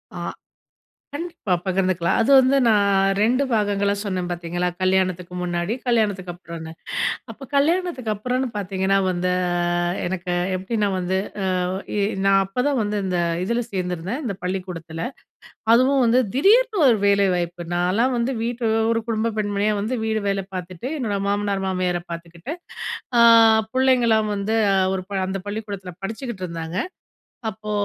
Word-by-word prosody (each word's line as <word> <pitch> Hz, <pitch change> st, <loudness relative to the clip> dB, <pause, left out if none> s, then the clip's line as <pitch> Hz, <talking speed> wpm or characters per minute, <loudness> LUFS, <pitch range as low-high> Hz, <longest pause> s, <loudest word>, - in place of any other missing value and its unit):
ஆ. -, -, -5 dB, 1.0 s
கண்டிப்பா 335 Hz, -, -3 dB
பகிர்ந்துக்கலாம். 185 Hz, -2 st, +1 dB
அது 235 Hz, +5 st, +2 dB
வந்து 260 Hz, +1 st, +5 dB
நான் 200 Hz, -3 st, +3 dB
2 250 Hz, +5 st, +3 dB
பாகங்களா 205 Hz, -2 st, +1 dB
சொன்னேன் 185 Hz, -4 st, -2 dB
பாத்தீங்களா, 175 Hz, +1 st, -2 dB
கல்யாணத்துக்கு 185 Hz, -1 st, +1 dB
முன்னாடி, 175 Hz, +3 st, -1 dB
கல்யாணத்துக்கு 205 Hz, -7 st, +1 dB
அப்புறம்னு. 170 Hz, -2 st, -9 dB, 0.6 s
அப்போ -, -, -12 dB
கல்யாணத்துக்கு 310 Hz, -5 st, +1 dB
அப்புறன்னு 250 Hz, +5 st, -1 dB
பார்த்தீங்கன்னா 195 Hz, -1 st, 0 dB
வந்து 180 Hz, 0 st, 0 dB, 0.2 s
ஆ -, -, +1 dB, 0.5 s
எனக்கு 180 Hz, 0 st, -3 dB, 0.2 s
எப்டின்னா 205 Hz, +3 st, -1 dB
வந்து 185 Hz, +1 st, -1 dB, 0.4 s
ஆ -, -, +1 dB, 0.4 s
இ -, -, 0 dB, 0.3 s
நான் 195 Hz, 0 st, +5 dB
அப்போதான் 250 Hz, +8 st, 0 dB
வந்து 210 Hz, 0 st, -1 dB
இந்த 180 Hz, -2 st, 0 dB, 0.2 s
இதுல 235 Hz, +5 st, 0 dB
சேர்ந்திருந்தேன். 180 Hz, -, -3 dB
இந்த 200 Hz, -5 st, -2 dB
பள்ளிக்கூடத்துல. 180 Hz, -3 st, -4 dB, 0.7 s
அதுவும் 260 Hz, +3 st, +4 dB
வந்து 240 Hz, +2 st, +4 dB, 0.2 s
திடீர்னு 430 Hz, -, +4 dB
ஒரு 235 Hz, -, +5 dB
வேலை 200 Hz, 0 st, +4 dB
வாய்ப்பு 175 Hz, 0 st, -3 dB
நான்லாம் 200 Hz, +9 st, +2 dB
வந்து 245 Hz, +3 st, 0 dB
வீட்டு 235 Hz, 0 st, -2 dB, 0.3 s
ஒரு 230 Hz, 0 st, 0 dB
குடும்ப 225 Hz, 0 st, 0 dB
பெண்மணியா 205 Hz, 0 st, 0 dB
வந்து 225 Hz, +5 st, -1 dB
வீடு 220 Hz, -1 st, 0 dB
வேலை 195 Hz, -1 st, -1 dB
பார்த்துட்டு, 185 Hz, +7 st, -5 dB
என்னோட 215 Hz, -6 st, -1 dB
மாமனார், 200 Hz, -1 st, 0 dB
மாமியார 180 Hz, -2 st, 0 dB
பார்த்துக்கிட்டு. 170 Hz, -, -7 dB, 0.7 s
ஆ. -, -, +8 dB, 0.5 s
புள்ளைங்கலாம் 240 Hz, -5 st, +3 dB
வந்து 205 Hz, +3 st, -1 dB, 0.4 s
ஒரு 190 Hz, -, -2 dB, 0.3 s
அந்த 195 Hz, +1 st, -2 dB
பள்ளிக்கூடத்துல 205 Hz, -3 st, -5 dB
படிச்சுகிட்டு 220 Hz, -1 st, -5 dB
இருந்தாங்க. 165 Hz, +1 st, -5 dB, 0.7 s
அப்போ 215 Hz, 0 st, -6 dB
200 Hz, 135 wpm, -22 LUFS, 185-230 Hz, 1.0 s, ஆ